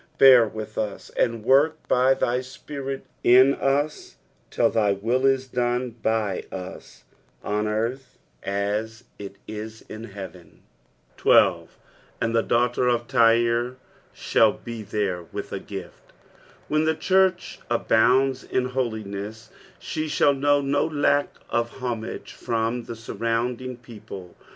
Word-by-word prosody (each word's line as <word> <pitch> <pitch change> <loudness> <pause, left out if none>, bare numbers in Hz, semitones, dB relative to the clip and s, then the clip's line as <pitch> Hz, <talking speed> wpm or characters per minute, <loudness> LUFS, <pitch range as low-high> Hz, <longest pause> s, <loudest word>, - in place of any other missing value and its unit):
Bear 130 -4 +8
with 110 0 -6
us, 105 -2 -4
and 115 -2 0
work 145 +5 +4
by 130 +1 +4
thy 125 -1 0
Spirit 135 +1 -7 0.2
in 130 +3 +7
us 145 +3 -1 0.3
till - - +2
thy 105 -3 +2
will 120 +7 +1
is 135 -1 +1
dono 125 0 -1
b; 110 -4 0
us 95 0 -9 0.4
on 105 +1 -1
earth 115 +5 -3 0.2
as 105 +3 -2 0.2
it 100 -1 -8
ia 110 0 -5 0.2
in 110 +1 -7
heaven. 95 -4 -11 0.6
13. - - +4 0.5
"Andthe 115 0 0
daughUr 125 +1 +2
of 120 0 -1
Tyre 120 0 +3 0.4
thnU - - +3 0.3
hethereteUh 95 -5 -3
a - - -3
gift." - - -10 0.5
When 155 +1 +1
the 160 0 +2
church 185 +2 +1
abounds 125 +3 +3
in 130 0 -1
holiness, 110 -3 -4 0.3
she 155 0 -4
rIihU 145 -1 +3
know 145 +1 +3
no 140 +1 +1
lock 145 -2 0
of 120 0 0
humsgc 120 -4 -5
from 115 +1 -2
the - - -6
Hurrounding 115 +2 -3
people. 105 -6 -10
120 Hz, 120 wpm, -24 LUFS, 110-135 Hz, 0.6 s, Bear